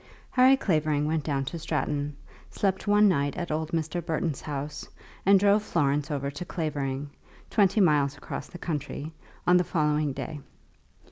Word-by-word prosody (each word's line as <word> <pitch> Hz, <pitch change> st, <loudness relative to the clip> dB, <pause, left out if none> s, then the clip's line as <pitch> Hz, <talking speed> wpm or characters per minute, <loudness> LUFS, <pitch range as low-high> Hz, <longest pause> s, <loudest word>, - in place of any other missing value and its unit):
Harry 260 Hz, +1 st, +6 dB
Clavering 155 Hz, -, +1 dB
went 155 Hz, 0 st, 0 dB
down 140 Hz, -3 st, -1 dB
to 165 Hz, +5 st, -5 dB
Stratton, 150 Hz, -2 st, -2 dB, 0.3 s
slept 190 Hz, -1 st, -1 dB
one 205 Hz, +1 st, +6 dB
night 145 Hz, -5 st, +1 dB
at 175 Hz, -2 st, -3 dB
old 155 Hz, 0 st, -1 dB
Mr. 165 Hz, +1 st, -2 dB
Burton's 160 Hz, -2 st, -2 dB
house, 145 Hz, 0 st, -5 dB, 0.4 s
and 200 Hz, 0 st, +7 dB
drove 205 Hz, +2 st, +4 dB
Florence 150 Hz, -7 st, 0 dB
over 140 Hz, -2 st, -2 dB
to 145 Hz, +5 st, -6 dB
Clavering, 145 Hz, -5 st, -3 dB, 0.4 s
twenty 205 Hz, -1 st, +3 dB
miles 145 Hz, -5 st, +3 dB
across -, -, -6 dB
the -, -, -10 dB
country, 155 Hz, -2 st, -4 dB, 0.3 s
on 180 Hz, 0 st, +6 dB
the 180 Hz, -, +3 dB
following 150 Hz, -3 st, +1 dB
day. 145 Hz, +3 st, -5 dB
155 Hz, 155 wpm, -27 LUFS, 145-180 Hz, 0.4 s, and